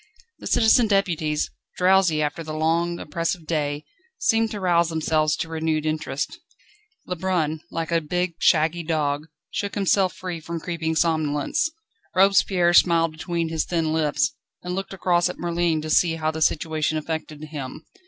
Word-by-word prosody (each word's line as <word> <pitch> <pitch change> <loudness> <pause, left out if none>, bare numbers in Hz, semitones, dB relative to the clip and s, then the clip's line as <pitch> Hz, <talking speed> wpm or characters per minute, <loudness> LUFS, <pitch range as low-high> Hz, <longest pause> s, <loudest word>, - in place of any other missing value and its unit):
The - - -7
citizen 225 +1 +4
deputies, 165 -7 0 0.3
drowsy 180 -4 +4
after 160 +3 -3
the 155 -1 -6
long, 165 +2 +1
oppressive 165 +2 -3
day, 150 -2 -2 0.3
seemed 225 - +2
to 210 -2 -5
rouse 170 -3 +2
themselves 155 -1 +1
to 165 - -3
renewed 160 -1 -1
interest. 155 - -3 0.7
Lebrun, 175 -4 -1
like 165 -1 -4
a 165 -1 +2
big, 180 +3 -1
shaggy 165 +1 +3
dog, 155 -2 -1 0.2
shook 200 - -3
himself 195 -2 +2
free 180 -3 -5
from 165 +1 -5
creeping 160 -1 -3
somnolence. 155 - +1 0.5
Robespierre 190 -2 +4
smiled 165 -2 +5
between 165 +1 -3
his 160 -1 -1
thin 165 -3 0
lips, 155 -2 +1 0.3
and 180 0 -4
looked 195 +1 -4
across 175 -2 +2
at - - -6
Merlin 170 -2 0
to 155 - -5
see 165 0 +4
how 155 -1 -1
the 160 0 -6
situation 155 0 +1
affected 155 -1 -5
him. 145 -4 -7
165 Hz, 155 wpm, -24 LUFS, 155-175 Hz, 0.7 s, smiled